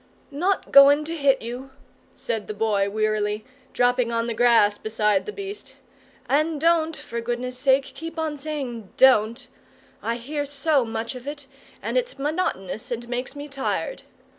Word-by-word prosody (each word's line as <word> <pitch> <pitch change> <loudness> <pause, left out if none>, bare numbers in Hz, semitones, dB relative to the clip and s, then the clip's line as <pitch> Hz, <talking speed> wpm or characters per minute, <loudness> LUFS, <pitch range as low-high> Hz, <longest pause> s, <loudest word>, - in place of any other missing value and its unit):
"Not 360 +7 -1
goin' 285 +2 +8
to 330 +2 -4
hit 280 -5 +2
you," 245 +3 -6 0.5
said 220 -3 -3
the 215 - -5
Boy 205 -2 +1
wearily, 215 0 -1 0.3
dropping 245 -1 +2
on 230 0 0
the 235 - -2
grass 225 -3 +4
beside 210 -2 +1
the - - -3
beast: 400 0 -8 0.5
"and 305 +2 +1
don't, 325 0 +2
for 235 0 -5
goodness' 245 +2 -3
sake, 270 0 +4
keep 330 +1 -8
on 315 -2 -1
saying 270 -8 -5
`Don't;' 235 -3 +4 0.6
I 230 - -1
hear 290 +5 -3
so 285 0 +1
much 225 +1 -4
of 250 +1 -10
it, 290 -1 -6 0.4
and - - +1
it's - - -6
monotonous, 275 - -2
and 240 -1 -4
makes 250 +3 -3
me 290 +1 -7
tired. 280 - -3
255 Hz, 160 wpm, -24 LUFS, 230-295 Hz, 0.6 s, goin